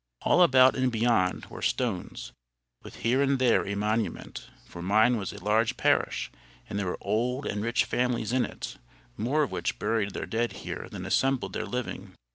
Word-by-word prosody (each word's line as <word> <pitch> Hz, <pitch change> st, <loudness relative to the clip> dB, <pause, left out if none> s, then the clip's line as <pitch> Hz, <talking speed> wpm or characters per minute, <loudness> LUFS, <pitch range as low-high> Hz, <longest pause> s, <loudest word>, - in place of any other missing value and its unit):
All 180 Hz, -, +4 dB
about 130 Hz, -5 st, +6 dB
and 130 Hz, -1 st, +1 dB
beyond 115 Hz, -5 st, +1 dB
were -, -, -10 dB
stones, 115 Hz, -8 st, -2 dB, 0.5 s
with -, -, -11 dB
here 125 Hz, +4 st, +3 dB
and 140 Hz, -1 st, +2 dB
there 125 Hz, -5 st, +3 dB
a 100 Hz, -, -2 dB
monument; 105 Hz, +2 st, -2 dB, 0.2 s
for 85 Hz, -, -10 dB
mine 110 Hz, +7 st, +4 dB
was 100 Hz, -4 st, -3 dB
a 100 Hz, -2 st, -11 dB
large 110 Hz, +2 st, +2 dB
parish, -, -, +1 dB, 0.4 s
and 100 Hz, -, -3 dB
there 100 Hz, -, -2 dB
were 90 Hz, -, -2 dB
old 120 Hz, +7 st, -1 dB
and 105 Hz, -, -2 dB
rich 115 Hz, +2 st, +1 dB
families 120 Hz, -2 st, -1 dB
in 130 Hz, -1 st, +3 dB
it, -, -, -6 dB, 0.4 s
more 140 Hz, -, +1 dB
of 140 Hz, -, -3 dB
which -, -, -2 dB
buried 105 Hz, -3 st, -1 dB
their -, -, -3 dB
dead 115 Hz, +1 st, -1 dB
here -, -, -5 dB
than -, -, -7 dB
assembled 135 Hz, -1 st, +1 dB
their -, -, -3 dB
living. 125 Hz, -1 st, -5 dB
115 Hz, 185 wpm, -28 LUFS, 105-125 Hz, 0.5 s, about